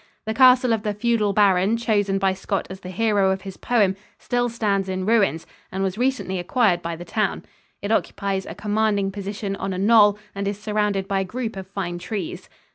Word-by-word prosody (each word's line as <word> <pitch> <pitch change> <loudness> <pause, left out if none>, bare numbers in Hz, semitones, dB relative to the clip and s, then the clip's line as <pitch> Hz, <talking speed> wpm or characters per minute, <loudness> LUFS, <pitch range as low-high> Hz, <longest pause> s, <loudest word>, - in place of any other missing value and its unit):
The 220 - -2
castle 250 0 +6
of 220 - 0
the 210 -1 -2
feudal 215 -1 +1
baron 200 +1 +3
chosen 205 -4 +1
by 195 -1 +2
Scott 190 0 -3
as 190 - -8
the 185 - -9
hero 205 -1 +2
of 190 0 -1
his 195 -2 -7
poem 205 -6 +1 0.2
still 245 0 -1
stands 200 -4 -1
in 185 0 -2
ruins, 200 -8 +2 0.3
and 190 +1 -2
was 190 -1 -1
recently 245 -6 -1
acquired 180 -1 +2
by 170 -1 -4
the 175 +2 -9
town. 210 +3 -1 0.4
It 205 - -2
occupies 195 -3 -1
a - - -7
commanding 210 -2 0
position 200 0 -4
on 195 0 -3
a - - -4
knoll 205 0 +5 0.2
and 200 0 -3
is 200 0 -3
surrounded 210 -2 -1
by 195 -1 0
a - - 0
group 225 +3 -4
of 190 -1 -7
fine 185 -3 -4
trees. 195 -2 -5
200 Hz, 200 wpm, -23 LUFS, 190-220 Hz, 0.4 s, castle